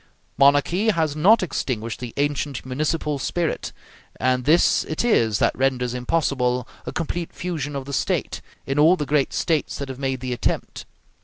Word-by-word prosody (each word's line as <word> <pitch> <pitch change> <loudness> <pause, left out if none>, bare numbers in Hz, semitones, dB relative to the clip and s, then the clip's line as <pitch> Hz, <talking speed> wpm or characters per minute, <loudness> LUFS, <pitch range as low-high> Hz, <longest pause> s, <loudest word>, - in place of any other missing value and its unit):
Monarchy 145 +9 +3
has 160 -7 +1
not 190 +8 +5
extinguished 115 -9 -3
the 125 -2 -6
ancient 145 -2 -1
municipal 150 +2 -1
spirit, 170 +4 -2 0.5
and 130 -1 +1
this 160 +4 +4
it 155 +9 -2
is 115 - +3
that - - +2
renders 125 -2 0
impossible 125 -2 0 0.2
a - - -2
complete 170 0 -3
fusion 155 -5 -4
of 135 -1 -4
the 140 - -7
State, - - -1 0.2
in 135 +1 -1
all 160 +5 +6
the 150 - -3
great 140 -1 +1
States 160 -4 -1
that 140 -1 -5
have 130 0 -7
made 135 -1 -1
the 130 -1 -3
attempt. 120 - -3
140 Hz, 165 wpm, -23 LUFS, 130-160 Hz, 0.5 s, all